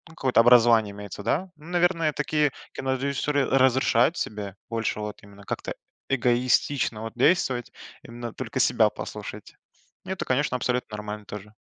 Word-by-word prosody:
какое-то 130 -6 +2
образование 115 -3 +6
имеется, 100 -1 -8
да, 160 - -1
ну, 150 - -16
наверное, 175 -3 +2
такие 150 0 +1 0.2
кинорежиссёры 135 +2 0
разрешают 130 +2 +3
себе 105 -3 -4
больше 115 -1 -2
вот 105 0 -6
именно 100 0 -15
как-то - - -4 0.4
эгоистично 125 -1 +1
вот 115 0 -6
действовать, 125 -3 +2 0.3
именно 120 0 -7
только - - -4
себя - - +4
послушать. - - -8 0.5
Это, 190 -1 -4
конечно, 130 0 +1
абсолютно 125 -3 -2
нормально 105 0 -6
тоже. 105 +1 -9
125 Hz, 135 wpm, -25 LUFS, 110-140 Hz, 0.5 s, образование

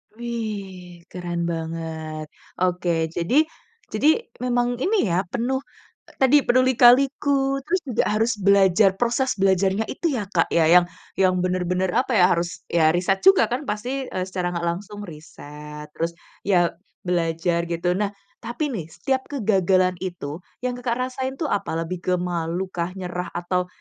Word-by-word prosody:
Wih, 200 -7 -6
keren 175 -1 -4
banget. 160 -1 -5 0.4
Oke, 180 -1 0 0.3
jadi 245 - +3 0.5
jadi 215 +7 +1 0.4
memang 245 -1 +1 0.2
ini 430 - +2
ya 175 +3 +1
penuh 250 +3 0 0.6
tadi 275 +3 +6
penuh 255 +1 +4
lika-liku 270 +2 +4
terus 350 +5 0
juga 245 - +1
harus 220 +3 +1
belajar 195 0 +4
proses 245 +4 0
belajarnya 195 +1 +2
itu 335 - -2
ya, 215 - -1
Kak, 165 - +2
ya 165 - +2
yang 180 0 +7 0.3
yang 185 -1 +4
bener-bener, 180 0 0
apa 250 +2 +1
ya, 180 - +6
harus 170 0 -2
ya 160 -1 +4
riset 190 +2 +1
juga 385 -9 +6
kan, 245 - 0
eee, - - -8
pasti 215 +4 -4 0.4
secara 180 -2 -3
nggak 170 - -2
langsung 205 +4 -4
riset 150 -3 -10
terus 165 +2 -3 0.3
ya 175 -4 +3 0.4
belajar 170 -1 0
gitu. 170 +1 -1
Nah, 205 -1 0 0.3
tapi 250 +5 -3
nih 175 -9 -4
setiap 260 +10 -2
kegagalan 190 -7 +2
itu 175 -4 -5 0.2
yang, 250 -1 -1
Kakak, 240 -1 -1 0.2
rasain 260 +1 -3
tuh 310 +3 -2
apa 200 -5 -1
lebih 180 +1 -5
ke 185 - +1
malukah, 175 +1 -3
nyerah, 180 -1 -4
atau 180 +1 -1
185 Hz, 150 wpm, -23 LUFS, 175-240 Hz, 0.6 s, yang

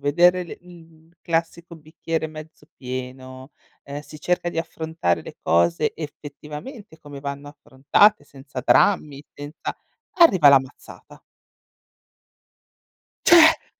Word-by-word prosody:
vedere 175 +6 +3
le - - -9
l 165 -2 -18
classico 170 +1 -3
bicchiere 160 +1 -5
mezzo 155 -1 -12
pieno, 130 +1 -8 0.3
ehm, 140 +1 -7
si 150 +1 -13
cerca 175 +1 -1
di 165 - -5
affrontare 160 - -2
le - - -11
cose 85 0 +1
effettivamente 155 - -10
come 145 -2 -11
vanno 140 0 -6
affrontate, 145 +6 +2
senza 140 -1 -9
drammi, 150 -5 +2
senza 145 +2 -7 0.5
arriva 185 - +7
la 140 - +8
mazzata. 130 +1 -14 2.1
Cioè. 325 -1 +6
155 Hz, 110 wpm, -22 LUFS, 140-170 Hz, 2.1 s, la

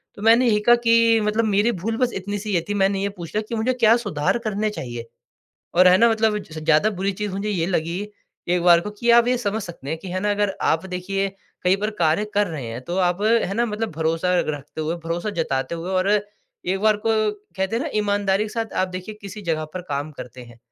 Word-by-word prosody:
तो 205 - -11
मैंने 230 +3 +5
यही 210 -2 +3
कहा 240 - +8
कि 230 -1 +5
मतलब 215 +2 +1
मेरी 210 +3 +2
भूल 225 +5 -2
बस 250 -1 +1
इतनी-सी 205 +2 -4
ये 170 - +2
थी, - - 0
मैंने 195 0 +1
ये 200 - 0
पूछ 180 -2 -9
लिया 215 - +2
कि 235 - -2
मुझे 230 +3 +1
क्या 230 -2 +5
सुधार 165 0 0
करने 215 +1 0
चाहिए। 120 - -6 0.7
और 180 +1 +6
है 180 - +7
ना 235 - +6
मतलब 220 -1 +2
जैसे 160 -6 -9
ज़्यादा 160 +7 +3
बुरी 195 0 -2
चीज़ 205 -2 -2
मुझे 200 +2 -3
ये 175 -5 0
लगी 175 0 -1 0.5
एक 175 -1 +2
बार 175 -1 +6
को 210 - -6
कि 235 +3 0
आप 235 0 +6
ये 250 - +3
समझ 220 -2 -2
सकते 170 -7 -9
हैं 160 +2 -2
कि 185 - -9
है 185 +1 -2
ना 210 - 0
अगर 205 -1 0
आप 165 +4 +1
देखिए, 195 +2 -2 0.3
कहीं 185 +1 +3
पर 210 +2 -2
कार्य 165 +5 +3
कर 205 0 +3
रहे 150 -8 -5
हैं, 115 +2 -6
तो 175 - -4
आप 180 +3 -2
है 220 -3 +2
ना? 235 +3 +1
मतलब 220 0 -3
भरोसा 165 +3 0
रखते 150 +1 -5
हुए, 155 +2 -1
भरोसा 170 +5 -2
जताते 135 -2 -1
हुए 170 +2 -5
और 185 +1 +1 0.6
एक 190 +2 0
बार 215 0 +4
को - - +3 0.5
कहते 190 +4 -1
हैं 245 - -1
ना 320 - -3
ईमानदारी 205 -1 +1
के - - -5
साथ 225 0 -4
आप 185 - +1
देखिए 185 +3 -7
किसी 200 +1 -8
जगह 160 -3 -1
पर 185 - -3
काम 145 +1 -3
करते 125 -2 -10
हैं। 120 -1 -15
195 Hz, 240 wpm, -22 LUFS, 170-215 Hz, 0.7 s, कहा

